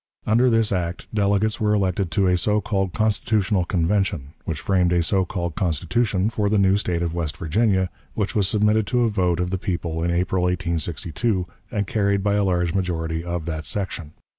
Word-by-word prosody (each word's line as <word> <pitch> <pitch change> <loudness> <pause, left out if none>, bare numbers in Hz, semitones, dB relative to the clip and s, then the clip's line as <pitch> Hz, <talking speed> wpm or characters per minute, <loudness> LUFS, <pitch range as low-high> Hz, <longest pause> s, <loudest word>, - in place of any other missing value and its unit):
Under 120 +4 +4
this 115 -1 +2
act 90 -2 -2
delegates 105 +1 +1
were 105 0 +3
elected 95 -2 0
to 95 +4 +1
a 90 -1 +3
so 105 +4 +2
called 95 -3 -1
Constitutional 105 -2 +1
Convention 85 -5 0
which 80 -4 -3
framed 90 0 +2
a 85 -1 +2
so 95 +2 +1
called 85 -2 -3
Constitution 95 +5 0
for 105 -2 0
the 105 - +2
new 95 -1 +4
State 90 -4 -1
of 85 -1 -2
West 80 -3 -3
Virginia, 95 +2 +1 0.3
which 105 -3 -1
was 100 -3 +2
submitted 105 0 +2
to 125 -1 +2
a 115 - +3
vote 90 -5 0
of 90 0 -1
the 95 - -1
people 85 -4 -3
in 85 - 0
April, 90 +2 0
1862, 90 - -1 0.2
and 105 -4 -1
carried 100 -1 0
by 100 0 +2
a 105 0 +2
large 90 -3 +1
majority 80 -3 -2
of 85 -2 -3
that 80 -2 -4
section. 90 -3 -4
95 Hz, 190 wpm, -23 LUFS, 85-105 Hz, 0.3 s, Under